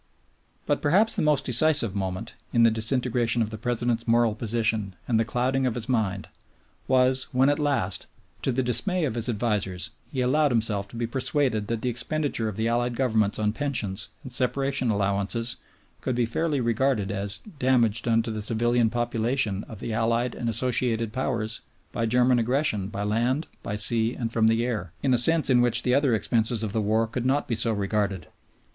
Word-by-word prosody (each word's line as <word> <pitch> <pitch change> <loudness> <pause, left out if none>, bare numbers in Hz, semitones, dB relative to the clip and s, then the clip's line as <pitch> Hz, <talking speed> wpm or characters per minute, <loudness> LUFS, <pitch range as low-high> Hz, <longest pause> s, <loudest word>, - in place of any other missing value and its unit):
But 145 - 0
perhaps 195 +9 +3
the - - 0
most 150 -2 +2
decisive 125 -3 +5
moment, 95 -2 -4 0.2
in 115 - +3
the 115 - +5
disintegration 120 0 0
of 110 - -5
the 110 - -6
President's 120 0 -1
moral 115 -1 +3
position 110 -3 -1
and 115 -3 +2
the - - +3
clouding 130 +3 0
of 120 - -2
his 120 0 -4
mind, 105 -6 -1 0.6
was 130 0 +3
when 130 +1 +3
at 145 +1 +1
last, 140 -11 -1 0.3
to - - 0
the 130 +2 0
dismay 155 - +1
of 130 - -2
his 120 +1 -3
advisers, 105 -5 -1 0.2
he 130 - -2
allowed 145 +4 +3
himself 110 -4 0
to 110 - -13
be 115 0 -2
persuaded 125 -3 -1
that 115 -1 -3
the 125 - +1
expenditure 130 -1 -2
of 105 - -7
the 110 +2 -1
Allied 120 +1 0
Governments 110 -5 +1
on 105 -1 0
pensions 115 -8 -2 0.2
and 130 -3 -8
separation 135 0 0
allowances 100 +3 0 0.4
could 130 - -2
be 120 -1 +1
fairly 150 +5 -1
regarded 115 -3 0
as 100 0 -2 0.2
"damage 120 -4 +2
done 115 0 +1
to 115 - -4
the 110 -1 -4
civilian 115 +2 +1
population 120 -2 -1
of 110 - -11
the 115 - -4
Allied 115 +2 0
and 115 - -3
Associated 115 -1 +1
Powers 115 -4 -2 0.3
by 115 -1 -1
German 125 +1 +3
aggression 115 -5 0
by 100 -1 -5
land, 120 +8 0 0.2
by 105 - -4
sea, 115 +3 +1
and 115 -2 -4
from 110 -1 +3
the 115 +1 +2
air," 105 -9 -4
in 135 -2 +2
a - - +4
sense 160 +3 +3
in 125 -1 +5
which 120 0 +2
the 125 - +1
other 140 -3 +3
expenses 115 +1 0
of 105 -2 -3
the 110 - 0
war 110 +2 +1
could 115 +2 -4
not 135 +3 0
be 120 - -2
so 115 +1 +1
regarded. 100 -4 -1
115 Hz, 190 wpm, -25 LUFS, 110-130 Hz, 0.6 s, decisive